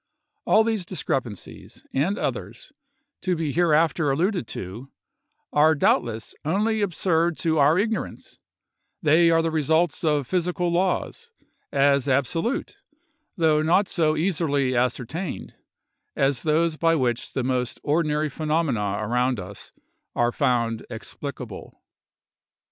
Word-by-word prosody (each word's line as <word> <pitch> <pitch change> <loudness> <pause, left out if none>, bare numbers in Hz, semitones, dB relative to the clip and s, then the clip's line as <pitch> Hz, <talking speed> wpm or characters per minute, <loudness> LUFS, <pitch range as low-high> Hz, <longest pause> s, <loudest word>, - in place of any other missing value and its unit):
All 220 - +5
these 220 -4 -1
discrepancies, 135 - -5
and 175 +10 +1
others, - - -4 0.5
to 185 -1 0
be 160 -3 -2
hereafter 160 -2 +2
alluded 175 - 0
to, 110 +9 -7 0.6
are 155 +2 +5
doubtless 115 -5 0
only 210 +7 0
absurd 170 -3 +1
to 160 -2 0
our 145 +4 +5
ignorance; 220 +3 -3 0.6
they 165 +2 +5
are 165 0 +3
the 165 - 0
results 160 +2 +1
of 150 -3 +1
physical 180 +2 -1
laws, 185 - -1 0.4
as 140 -1 +3
absolute, 165 - -1 0.6
though 155 -3 +3
not 175 +6 +3
so 155 -2 +1
easily 150 -6 0
ascertained, 125 +8 -2 0.6
as 135 -2 +1
those 160 +1 +1
by 165 +1 +3
which 125 -5 -1
the 130 - -1
most 125 -1 -1
ordinary 150 0 +1
phenomena 145 -10 -1
around 125 +2 0
us 95 +2 -8 0.4
are 120 0 +2
found 120 -5 0
explicable. 120 -1 -8
155 Hz, 115 wpm, -24 LUFS, 130-170 Hz, 0.6 s, All